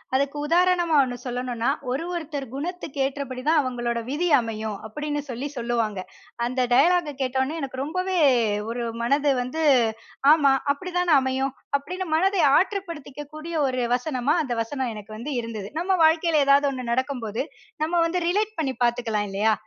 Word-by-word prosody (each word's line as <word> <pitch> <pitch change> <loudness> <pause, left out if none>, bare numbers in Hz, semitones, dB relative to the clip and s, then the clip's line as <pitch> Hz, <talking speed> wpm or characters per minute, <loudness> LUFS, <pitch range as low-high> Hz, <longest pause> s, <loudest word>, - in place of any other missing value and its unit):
அதுக்கு 280 +2 0
உதாரணமா 350 -1 +3
ஒண்ணு 245 -1 -4
சொல்லணும்னா, 245 -1 -2 0.2
ஒரு 280 +6 -1
ஒருத்தர் 295 -5 -4
குணத்துக்கு 315 -1 -5
ஏற்றபடி 270 -2 -4
தான் 315 -1 +5
அவங்களோட 240 -2 -2
விதி 325 +6 0
அமையும். 220 -3 -4
அப்டின்னு 295 +4 -3
சொல்லி 250 +4 -4
சொல்லுவாங்க. 230 -4 -1 0.5
அந்த 255 +1 -1
டயலாகை 320 +2 +4
கேட்டவுடனே, 265 +5 -1
எனக்கு 260 -1 -4
ரொம்பவே 365 +4 -2 0.5
ஒரு 240 0 -3 0.2
மனது 280 +3 +2
வந்து 315 +6 -3 0.7
ஆமா. 280 -4 +4 0.2
அப்படிதானே 355 +1 0
அமையும் 265 +1 -1 0.2
அப்படின்னு 365 +6 -5
மனதை 380 +1 +2 0.2
ஆற்றுப்படுத்திக்க 320 -7 -3
கூடிய 325 +2 -6
ஒரு 255 -1 -1
வசனமா, 260 +2 0
அந்த 250 - -3
வசனம் 260 0 -3
எனக்கு 210 +1 -9
வந்து 275 +5 -5
இருந்தது. 215 -3 -6
நம்ம 380 +2 +1
வாழ்க்கையில 320 -2 +3
ஏதாவது 280 +1 +5
ஒண்ணு 250 -2 -4
நடக்கும்போது 245 -4 -2 0.4
நம்ம 335 +3 -1
வந்து 355 +2 -2
ரிலேட் 425 +2 0
பண்ணி 270 -4 0
பார்த்துக்கலாம் 230 -4 0
இல்லையா? 215 +3 +2
275 Hz, 145 wpm, -24 LUFS, 245-320 Hz, 0.7 s, தான்